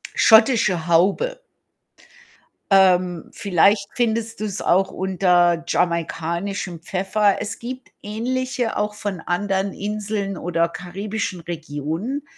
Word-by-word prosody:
schottische 220 Hz, -7 st, +5 dB
Haube. 195 Hz, -, +2 dB, 1.3 s
Ähm, 180 Hz, -3 st, +3 dB
vielleicht 200 Hz, +2 st, +2 dB
findest 225 Hz, -2 st, -1 dB
du's 205 Hz, -2 st, -3 dB
auch 190 Hz, +1 st, +2 dB
unter 175 Hz, -2 st, +2 dB
jamaikanischem 170 Hz, +2 st, -2 dB
Pfeffer. 195 Hz, +3 st, +1 dB
Es 210 Hz, -, -4 dB
gibt 255 Hz, +2 st, -7 dB
ähnliche 245 Hz, +2 st, -2 dB
auch 210 Hz, 0 st, -1 dB
von 200 Hz, -4 st, -4 dB
anderen 190 Hz, +2 st, -1 dB
Inseln 205 Hz, -1 st, -3 dB
oder 170 Hz, 0 st, 0 dB
karibischen 190 Hz, +1 st, -5 dB
Regionen, 165 Hz, -, -4 dB
195 Hz, 95 wpm, -22 LUFS, 175-215 Hz, 1.3 s, schottische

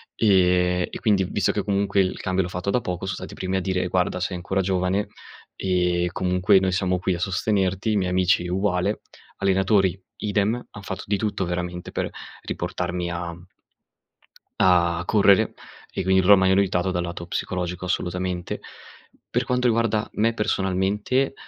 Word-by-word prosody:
ehm, 90 Hz, -3 st, +3 dB
e -, -, -7 dB
quindi, 105 Hz, -4 st, +2 dB
visto -, -, 0 dB
che -, -, -2 dB
comunque 100 Hz, 0 st, 0 dB
il 95 Hz, -1 st, +1 dB
cambio 95 Hz, 0 st, 0 dB
l'ho 90 Hz, -, -3 dB
fatto 90 Hz, +2 st, -2 dB
da 125 Hz, -, +1 dB
poco, 90 Hz, 0 st, -4 dB
so 95 Hz, -, -2 dB
stati -, -, -7 dB
primi 95 Hz, 0 st, -2 dB
a -, -, +1 dB
dire: 95 Hz, 0 st, -1 dB
"Guarda, 90 Hz, 0 st, 0 dB
sei 90 Hz, 0 st, -2 dB
ancora 95 Hz, +2 st, -1 dB
giovane, 95 Hz, +2 st, 0 dB, 0.5 s
ehm, 90 Hz, -2 st, +1 dB
comunque 90 Hz, +2 st, +3 dB
noi 95 Hz, 0 st, 0 dB
siamo 90 Hz, 0 st, +1 dB
qui 90 Hz, +1 st, -1 dB
a 85 Hz, -, -4 dB
sostenerti." 95 Hz, +2 st, 0 dB
I -, -, +1 dB
miei 90 Hz, -2 st, 0 dB
amici 90 Hz, -1 st, +2 dB
uguale, 95 Hz, +2 st, 0 dB, 0.4 s
allenatori 95 Hz, -1 st, +2 dB, 0.2 s
idem, 105 Hz, +2 st, 0 dB, 0.2 s
han 105 Hz, -, -10 dB
fatto 95 Hz, -1 st, -6 dB
di 100 Hz, 0 st, +1 dB
tutto 105 Hz, -2 st, -2 dB
veramente 90 Hz, 0 st, -4 dB
per -, -, -2 dB, 0.3 s
riportarmi 90 Hz, 0 st, -3 dB
a 85 Hz, -1 st, -4 dB, 1.2 s
a 85 Hz, -2 st, +3 dB
correre 100 Hz, -2 st, +4 dB, 0.4 s
e -, -, -3 dB
quin 95 Hz, 0 st, +4 dB
loro 100 Hz, +1 st, +7 dB
m'hanno 95 Hz, 0 st, +3 dB
aiutato 95 Hz, -2 st, +2 dB
dal 90 Hz, -1 st, -1 dB
lato 85 Hz, 0 st, -6 dB
psicologico 90 Hz, 0 st, -3 dB
assolutamente. 90 Hz, 0 st, -2 dB, 0.7 s
Per -, -, 0 dB
quanto 125 Hz, 0 st, +1 dB
riguarda 115 Hz, -2 st, +1 dB
me 115 Hz, +2 st, +1 dB
personalmente, 105 Hz, +5 st, 0 dB
95 Hz, 160 wpm, -24 LUFS, 90-100 Hz, 1.2 s, loro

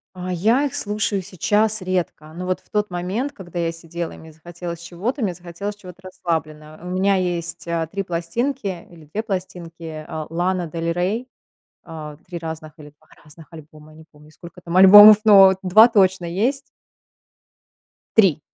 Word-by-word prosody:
А, 185 Hz, 0 st, -6 dB
я 225 Hz, +11 st, +2 dB
их 270 Hz, -, -6 dB
слушаю 205 Hz, -2 st, -1 dB
сейчас 205 Hz, +3 st, 0 dB
редко, 175 Hz, -4 st, -4 dB
но 180 Hz, -, -5 dB
вот 185 Hz, 0 st, -2 dB
в -, -, -30 dB
тот 210 Hz, -2 st, -1 dB
момент, 190 Hz, +11 st, -3 dB
когда 175 Hz, -3 st, -9 dB
я 165 Hz, -1 st, -1 dB
сидела 165 Hz, 0 st, -7 dB
и -, -, -12 dB
мне 160 Hz, 0 st, -13 dB
захотелось 170 Hz, +1 st, -8 dB
чего-то- 195 Hz, +10 st, -4 dB
мне 190 Hz, -4 st, 0 dB
захотелось 180 Hz, +4 st, -7 dB
чего-то 185 Hz, -2 st, -14 dB
расслабленного. 155 Hz, -4 st, -5 dB
У -, -, -6 dB
меня 195 Hz, +1 st, +1 dB
есть, 170 Hz, -2 st, -3 dB
э, 165 Hz, -1 st, -2 dB
3 195 Hz, 0 st, -3 dB
пластинки 190 Hz, +3 st, -3 dB
или 165 Hz, -3 st, -16 dB
2 210 Hz, +9 st, -4 dB
пластинки, 170 Hz, -6 st, -6 dB
а, 155 Hz, -1 st, -6 dB
Лана 175 Hz, +1 st, -1 dB
Дель 165 Hz, +1 st, -3 dB
Рей, 205 Hz, +9 st, -2 dB, 0.6 s
а, 155 Hz, -3 st, -9 dB
3 175 Hz, -1 st, -6 dB
разных 160 Hz, -1 st, -7 dB
или 150 Hz, -1 st, -12 dB
2 -, -, -29 dB, 0.2 s
разных 155 Hz, +1 st, -15 dB
альбома, 155 Hz, -1 st, -14 dB
я 155 Hz, -, -17 dB
не 160 Hz, -, -14 dB
помню, 150 Hz, +1 st, -19 dB
сколько 170 Hz, +3 st, -13 dB
там 170 Hz, +1 st, -4 dB
альбомов, 205 Hz, +2 st, +10 dB
но 195 Hz, -3 st, +7 dB
2 210 Hz, +5 st, +7 dB
точно 190 Hz, -6 st, +2 dB
есть. 225 Hz, +11 st, -1 dB, 1.6 s
3! 185 Hz, -8 st, +4 dB
175 Hz, 170 wpm, -21 LUFS, 165-195 Hz, 1.6 s, альбомов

